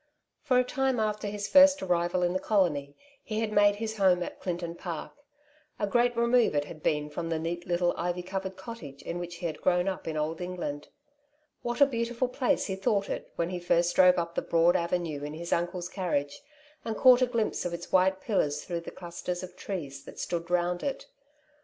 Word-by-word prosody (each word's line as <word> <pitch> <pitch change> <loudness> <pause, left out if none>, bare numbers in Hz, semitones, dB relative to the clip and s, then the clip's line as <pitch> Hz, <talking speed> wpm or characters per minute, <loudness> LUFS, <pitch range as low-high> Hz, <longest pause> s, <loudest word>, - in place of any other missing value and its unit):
For 265 -4 +2
a 250 - +5
time 265 -1 0
after 210 -1 -1
his 205 0 -3
first 285 -2 +7
arrival 175 0 +1
in 175 0 +1
the 185 - 0
colony, 150 -10 0 0.3
he 215 0 -3
had 220 -1 -1
made 205 -1 +5
his 220 +1 -4
home 185 -3 +4
at - - -8
Clinton 170 -2 -3
Park. 170 -2 -6 0.7
A 205 - 0
great 240 +3 +2
remove 235 -5 +3
it 145 0 +1
had 155 +1 -10
been 150 -1 0
from 165 +2 -4
the 165 - 0
neat 170 +2 -4
little 175 0 +1
ivy 175 +1 -2
covered 190 +1 -4
cottage 170 -10 -9
in 170 - -4
which 175 0 -6
he 175 +1 -7
had 155 -2 -4
grown 180 0 +2
up 190 -3 -3
in 160 -1 -2
Old 155 +3 -2
England. 175 -5 -4 0.7
What 240 +2 -3
a - - +10
beautiful 240 -1 -1
place 250 0 +1
he 190 - -2
thought 200 +1 0
it - - -5
when 170 +1 -1
he 180 - -3
first 175 0 +2
drove 180 -1 +6
up 170 -1 -2
the - - -1
broad 170 +1 +3
avenue 170 -4 -1
in 150 +1 -5
his 170 +2 -3
uncle's 175 +1 -1
carriage, 165 -7 -2 0.4
and 220 -2 -3
caught 255 -1 +7
a 255 - +4
glimpse 230 -3 -1
of 175 - -2
its 170 0 -7
white 190 0 +3
pillars 150 -9 0
through 170 -2 -3
the - - -8
clusters 175 +1 -5
of 180 0 -9
trees 140 -8 -6
that - - -11
stood 170 -1 -3
round 175 0 +1
it 275 -1 -3
180 Hz, 210 wpm, -29 LUFS, 170-210 Hz, 0.7 s, a